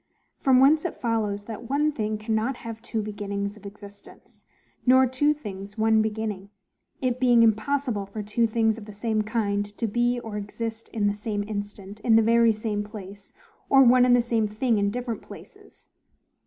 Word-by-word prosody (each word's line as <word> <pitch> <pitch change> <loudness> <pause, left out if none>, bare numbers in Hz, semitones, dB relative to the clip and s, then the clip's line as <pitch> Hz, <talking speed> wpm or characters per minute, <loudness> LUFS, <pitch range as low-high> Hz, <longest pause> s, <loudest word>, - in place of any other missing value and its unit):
From 260 -2 +4
whence 295 +4 +5
it 355 - -4
follows, 215 -4 -1
that 225 +1 -8
one 295 +3 +2
thing 215 -6 -2
cannot 220 +4 -1
have 225 -1 -6
two 225 -2 -3
beginnings 200 -1 -4
of 210 -1 -11
existence, 200 0 -15 0.4
nor 260 +1 +6
two 260 +4 +2
things 205 -8 -7
one 220 0 +3
beginning; 215 -2 -3 0.5
it 255 -1 0
being 245 -2 +5
impossible 225 -1 0
for 210 +2 -6
two 230 +3 +1
things 225 0 +1
of 210 - -11
the 210 - -10
same 215 +1 -1
kind 210 -2 -1
to 235 - -1
be 240 +3 0
or 220 -3 -6
exist 225 +2 -5
in 215 -2 -2
the 205 - +2
same 205 0 -3
instant, 205 -1 -7
in 225 +1 +3
the 225 - +5
very 230 0 +4
same 215 -1 -3
place; 200 -2 -11 0.4
or 270 0 +7
one 250 0 +6
and 250 -1 +5
the 245 - +3
same 230 -2 0
thing 220 +1 0
in 200 0 +1
different 240 +1 -4
places. - - -15
220 Hz, 180 wpm, -25 LUFS, 205-240 Hz, 0.5 s, or